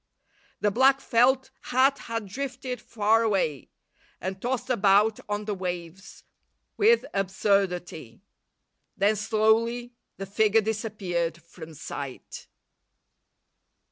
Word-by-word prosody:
The 205 - +2
black 265 +5 +4
felt 260 +2 +2
hat 265 +2 +3
had 230 -2 -4
drifted 255 +2 -5
far 220 0 +2
away, 190 - 0 0.5
and 190 +1 -5
tossed 250 +1 -2
about 210 -1 +3
on 205 0 -2
the 210 - -2
waves 180 -1 -6 0.5
with 455 +3 +4
absurdity. 190 - -1 0.7
Then, 205 +2 +3
slowly, 225 +3 +1 0.2
the 195 - -5
figure 215 +2 +3
disappeared 195 -6 -2
from 165 -1 -12
sight. 140 -2 -8
210 Hz, 100 wpm, -26 LUFS, 190-240 Hz, 0.7 s, black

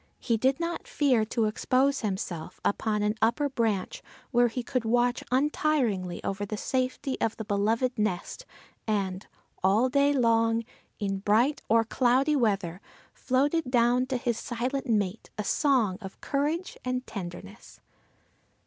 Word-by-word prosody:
He 230 - 0
did 260 +5 +1
not 340 0 -3
fear 260 -7 +2
to 225 0 0
expose 260 +5 +1
himself 190 -6 -4
upon 210 0 0
an 210 0 +2
upper 280 +6 +2
branch, 230 - -1 0.3
where 240 -1 +4
he 240 +2 -4
could 250 0 -1
watch 245 +2 +1
untiringly 255 - 0
over 195 +1 -2
the 210 +1 -4
safety 260 +3 -2
of 225 - 0
the 220 - -5
beloved 220 +5 0
nest 215 - -2 0.4
and 195 -3 -1 0.4
all 210 +7 +4
day 280 +2 +3
long, 230 -3 +2 0.3
in 195 -2 -2
bright 225 +8 +2
or 225 +1 +5
cloudy 260 +5 +2
weather, 195 - 0 0.3
floated 275 +3 0
down 245 +1 +3
to 260 -1 -1
his 240 -2 -1
silent 250 +3 -3
mate 210 -2 -1
a 210 - -2
song 230 -6 +2
of 190 -2 -9
courage 300 +6 -2
and 255 0 -2
tenderness. 195 +2 -9
235 Hz, 140 wpm, -28 LUFS, 210-260 Hz, 0.4 s, or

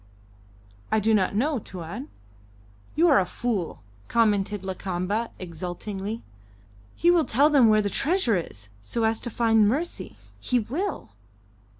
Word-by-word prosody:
"I 220 - +3
do 220 +2 +2
not 200 -2 +2
know, 275 +5 +1
Tuan." 190 - -7 0.9
"You 340 +2 +4
are 290 - +6
a 185 - +1
fool," 200 - -3 0.2
commented 205 -3 +1
Lakamba, 190 +4 -2
exultingly. 190 +5 -5 0.7
"He 345 - +4
will 345 -2 +4
tell 285 +7 +3
them 270 -6 +6
where 215 -1 +4
the 205 - 0
treasure 300 - +1
is, 100 - -5
so 105 - -3
as 220 0 +1
to - - -3
find 225 -2 +3
mercy. 300 +10 -2 0.2
He 250 - 0
will." 285 - -3
220 Hz, 135 wpm, -25 LUFS, 190-250 Hz, 0.9 s, are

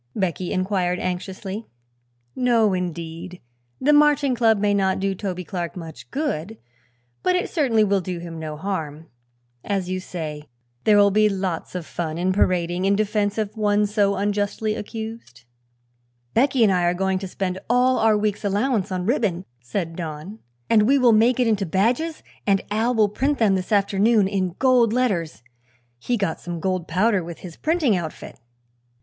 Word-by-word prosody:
Becky 185 -2 -2
inquired 185 -1 0
anxiously. 190 +4 -4 0.7
"No, 235 -5 +3
indeed. 175 0 -5 0.4
The 295 +3 +3
Marching 295 -2 +4
Club 225 -2 +3
may 205 0 +1
not 190 -2 +1
do 195 0 0
Toby 185 -2 -4
Clark 175 -2 -5
much 165 -3 -9
good, 225 - -3 0.6
but 365 - +2
it 360 - -1
certainly 245 -9 +2
will 200 -2 +2
do 180 0 -4
him 170 -1 -7
no 155 -1 -5
harm. 160 -4 -5 0.5
As 195 -3 -2
you 185 - -1
say, 155 -5 -6 0.4
there 210 -1 +5
will 200 0 +5
be 215 +1 +4
lots 185 -3 -3
of 180 -3 -4
fun 160 -1 -4
in 185 +2 +1
parading 180 -1 +1
in 200 +1 +3
defense 210 0 0
of 215 0 -2
one 210 -1 +2
so 205 -1 +1
unjustly 205 +2 -1
accused." 220 - -7 0.9
"Becky 260 0 +3
and 200 -3 +4
I 180 - +2
are 175 +1 +2
going 190 0 0
to 190 - -5
spend 185 0 -3
all 250 +1 +3
our 220 -1 +4
week's 210 0 -1
allowance 205 0 0
on 180 -1 -2
ribbon," 205 - 0
said 165 +7 -4
Don, 165 +5 -6 0.3
"and 215 -2 +4
we 280 +2 +5
will 250 -3 +5
make 230 +4 +4
it 250 - +3
into 215 -3 +1
badges 235 - 0 0.2
and 195 -1 +3
Al 225 +4 +1
will 215 -2 +4
print 275 +7 0
them 215 -4 +3
this 185 +1 -2
afternoon 205 +1 +3
in 185 -3 -2
gold 250 -4 +4
letters. 185 - -1 0.6
He 245 - -1
got 195 -6 -2
some 175 -1 -6
gold 185 0 -2
powder 190 +2 +2
with 170 0 -9
his 175 -3 -9
printing 310 - +1
outfit." 165 -8 -6
200 Hz, 170 wpm, -23 LUFS, 180-220 Hz, 0.9 s, there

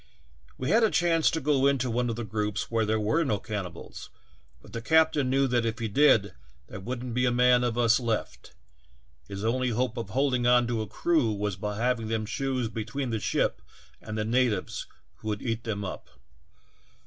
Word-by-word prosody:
We 130 - -2
had 230 - +5
a 220 - +5
chance 170 -5 +3
to 165 - -1
go 140 -2 +2
into 130 -3 +1
one 120 +1 0
of 115 - -2
the 120 - -4
groups 105 +1 -3
where 115 -2 +1
there 110 0 +1
were 110 +11 +1
no 110 -9 0
cannibals, 100 -6 -7 0.5
but - - -17
the 115 - -4
captain 160 -1 +3
knew 135 +1 +3
that 120 -1 +2
if 115 0 -2
he 115 - -2
did 110 -3 +4 0.3
there 65 - -9
would 120 +5 -5
n't 125 -2 -5
be 125 +1 +1
a - - +2
man 125 0 +4
of 120 -1 -1
us 115 -1 +4
left; 115 -3 -4 0.7
his 100 +1 -5
only 125 +2 +1
hope 120 +1 -1
of 115 -4 -4
holding 130 0 +1
on 125 0 +5
to 115 -2 -1
a 110 - -4
crew 150 - +1
was 105 -1 -2
by 105 +2 -4
having 120 -1 0
them 110 -1 -1
choose 130 +1 -2
between 115 +4 -4
the 110 - -1
ship - - 0 0.4
and 105 - -6
the 105 - -1
natives 120 -1 0 0.3
who - - -10
would 105 -1 -2
eat 115 -1 -3
them 105 -3 -3
up. 90 - -7
120 Hz, 205 wpm, -27 LUFS, 110-130 Hz, 0.7 s, had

